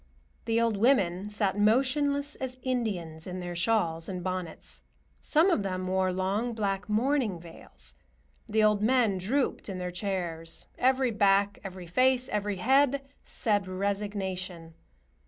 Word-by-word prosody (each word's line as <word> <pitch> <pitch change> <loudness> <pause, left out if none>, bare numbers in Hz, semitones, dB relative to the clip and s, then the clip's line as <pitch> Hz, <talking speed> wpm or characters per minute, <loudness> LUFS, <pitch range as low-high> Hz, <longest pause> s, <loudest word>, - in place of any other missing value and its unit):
The 230 0 +1
old 230 -3 +1
women 200 -5 +2
sat 205 -1 -1
motionless 280 +6 +2
as 255 -1 -5
Indians 195 -11 -3
in 185 0 -5
their 175 -1 -5
shawls 170 -4 +1
and 180 -2 -4
bonnets; 185 -3 -5 0.4
some 330 +5 +3
of 280 - +2
them 185 -1 -3
wore 185 0 +1
long 195 +6 -1
black 195 -2 -2
mourning 230 -3 +1
veils. 65 - -11 0.5
The 215 0 +2
old 210 -1 +3
men 225 -4 +3
drooped 250 +5 -1
in 190 - -4
their 180 0 -4
chairs. 175 -4 -3
Every 260 -1 +3
back, 200 -1 +3
every 185 -2 -7
face, 255 +7 +2
every 205 -1 -1
head 275 +6 +2 0.2
said 205 -3 0
"resignation." 190 -3 -3
200 Hz, 140 wpm, -29 LUFS, 185-240 Hz, 0.5 s, some